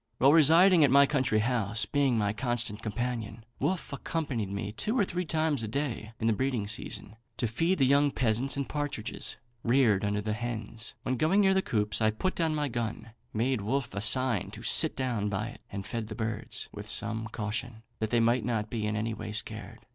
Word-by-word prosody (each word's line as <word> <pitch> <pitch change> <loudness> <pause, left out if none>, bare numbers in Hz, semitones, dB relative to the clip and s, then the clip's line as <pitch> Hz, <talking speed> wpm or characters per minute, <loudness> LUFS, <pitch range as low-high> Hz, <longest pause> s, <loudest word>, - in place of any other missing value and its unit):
While 135 +3 +5
residing 165 +3 +6
at 140 - +5
my 140 +2 +7
country 130 -6 +1
house, 115 -3 0
being 140 -4 +1
my 105 -1 +1
constant 120 -3 -3
companion, 115 0 -4 0.2
Wolfe 185 -5 -1
accompanied 140 -7 -3
me 100 +1 -4
two 210 - -1
or 220 - +4
three 180 0 -3
times 155 -4 0
a 110 - -3
day 115 -3 -3
in - - -2
the 115 - +4
breeding 125 -3 -1
season 105 0 -4 0.2
to - - 0
feed 165 - +1
the 135 - +4
young 140 +2 +4
pheasants 130 +1 0
and 140 - -2
partridges 145 -6 -3 0.3
reared 120 -5 +3
under 105 0 0
hens. 115 -1 -4
On 130 - 0
going 160 - +3
near 190 -1 +4
the 190 - +3
coops, 105 - +2
I 110 - +4
put 110 +13 -1
down 160 -2 0
my 150 -1 0
gun, 115 -2 -4 0.2
made 120 +1 0
Wolfe 125 +4 -2
a 100 - -3
sign 120 -1 +2
to - - -9
sit - - +4
down 120 -6 -1
by 105 +3 -2
it, - - -13
and 100 -1 -5
fed 110 0 -4
the 110 - -7
birds, 110 -1 -3
with - - -8
some 110 0 0
caution, 110 +2 -4 0.2
that 110 - -1
they 120 - +2
might 115 +1 +3
not 110 -2 -2
be 110 -3 -2
in 105 - -1
any 110 +2 -1
way 105 - -6
scared. 105 - -4
120 Hz, 205 wpm, -29 LUFS, 110-140 Hz, 0.3 s, my